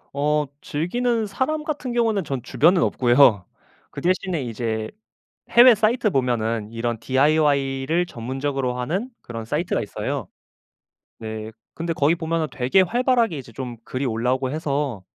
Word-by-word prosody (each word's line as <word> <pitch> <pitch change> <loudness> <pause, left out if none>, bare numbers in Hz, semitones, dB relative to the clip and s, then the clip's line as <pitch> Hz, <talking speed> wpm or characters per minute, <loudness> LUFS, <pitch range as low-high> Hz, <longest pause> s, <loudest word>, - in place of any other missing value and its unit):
어. 150 +1 +1
즐기는 220 +9 -1
사람 300 +10 -2
같은 290 -5 -3
경우에는 225 -4 +1
전 135 -3 -4
주변은 170 +8 +3
없고요. 120 -5 +4 0.5
그 - - -7
대신에 180 -3 0
이제 110 -2 -3 0.6
해외 245 +1 +8
사이트 215 +1 +1
보면은 115 - -1
이런 115 0 -3
DIY를 140 +3 +2
전문적으로 130 -1 -3
하는 185 - -2
그런 115 -2 -7
사이트가 110 - -1
있어요. - - -4 0.9
네. 110 0 -6 0.2
근데 165 0 -2
거기 155 +2 +2
보면은 165 -1 -1
되게 125 +9 +3
활발하게 235 - +1
이제 125 -3 -9
좀 120 0 -6
글이 130 +2 -3
올라오고 125 +2 0
해서... 140 - -2
145 Hz, 315 characters per minute, -23 LUFS, 125-185 Hz, 0.9 s, 해외